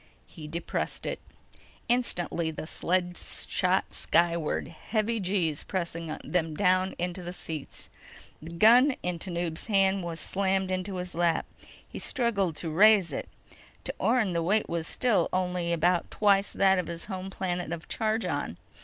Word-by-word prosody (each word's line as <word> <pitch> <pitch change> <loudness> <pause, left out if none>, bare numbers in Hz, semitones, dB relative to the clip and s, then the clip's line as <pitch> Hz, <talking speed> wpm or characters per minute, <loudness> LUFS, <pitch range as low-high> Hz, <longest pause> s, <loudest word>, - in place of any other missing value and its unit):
He 155 -4 -10
depressed 170 +2 -3
it. - - -3 0.7
Instantly, 175 -9 0
the 155 0 -6
sled 175 +2 -1 0.3
shot 185 +1 +1
skyward, 170 -2 +1
heavy 215 +6 -1
G's 180 -6 0
pressing 170 -4 -3
them 165 -3 -1
down 185 0 +2
into 180 +1 -3
the 175 0 -5
seats. 160 -5 -6 0.5
The 165 +2 -8
gun 245 +8 +6
in 180 -1 -2
Tanub's 170 -1 -3
hands 195 -2 +3
was 170 -1 -4
slammed 190 -1 0
into 185 +1 -2
his 180 0 -4
lap. 170 -1 +1 0.4
He - - -8
struggled 200 - 0
to 165 0 -4
raise 200 +1 +6
it. - - -4 0.5
To - - -4
Orne, 220 -8 +2
the 170 - +1
weight 205 +6 +2
was 170 -1 -2
still 245 -4 +2
only 180 -2 -1
about 170 +1 +2
twice 200 -1 +3
that 190 -1 +4
of 180 - -2
his 170 0 -5
home 190 -1 -5
planet 180 -3 -3
of 170 -1 -5
Chargon. 215 - -1
180 Hz, 150 wpm, -28 LUFS, 170-195 Hz, 0.7 s, gun